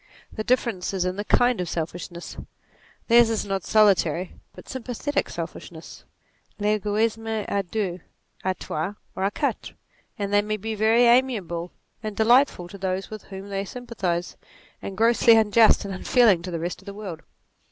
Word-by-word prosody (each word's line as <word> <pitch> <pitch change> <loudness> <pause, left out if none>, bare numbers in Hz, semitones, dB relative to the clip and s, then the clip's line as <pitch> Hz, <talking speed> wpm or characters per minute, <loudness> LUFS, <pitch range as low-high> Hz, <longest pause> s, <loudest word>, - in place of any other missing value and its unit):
The 215 - -4
difference 230 -6 0
is 185 -1 0
in 185 0 -1
the 205 - -3
kind 245 +1 +3
Q 180 - -1
selfishness: 170 +1 -5 0.7
theirs 235 -1 +6
is 225 -2 -1
not 195 -2 -2
solitary 190 -5 +3 0.2
but - - -13
sympathetic 260 +3 -3
selfishness; - - -8 0.5
Pegoismc 215 +1 0
a 200 - 0
deux, 185 -1 -3 0.4
a 185 0 0
trois, 170 +6 -4 0.2
or 190 - -1
a - - +3
quatre; - - -3 0.4
and 200 -1 -3
they 205 - +5
may 215 +1 -2
be 220 +2 -4
very 220 +3 +3
amiable 220 -9 +2 0.3
and 215 -2 -5
delightful 235 -5 +4
to 200 - -10
those 190 +1 -3
with 215 -1 -8
whom 195 +1 -9
they 195 0 -2
sympathize, 195 -6 -4 0.4
and 195 - -7
grossly 230 +1 +5
unjust 220 0 +5
and 195 - -4
unfeeling 205 -1 +3
to 180 - -6
the 170 -2 -3
rest 175 +3 -4
of 195 - -21
the 200 - -7
world. 190 -6 -7
205 Hz, 165 wpm, -24 LUFS, 185-225 Hz, 0.7 s, theirs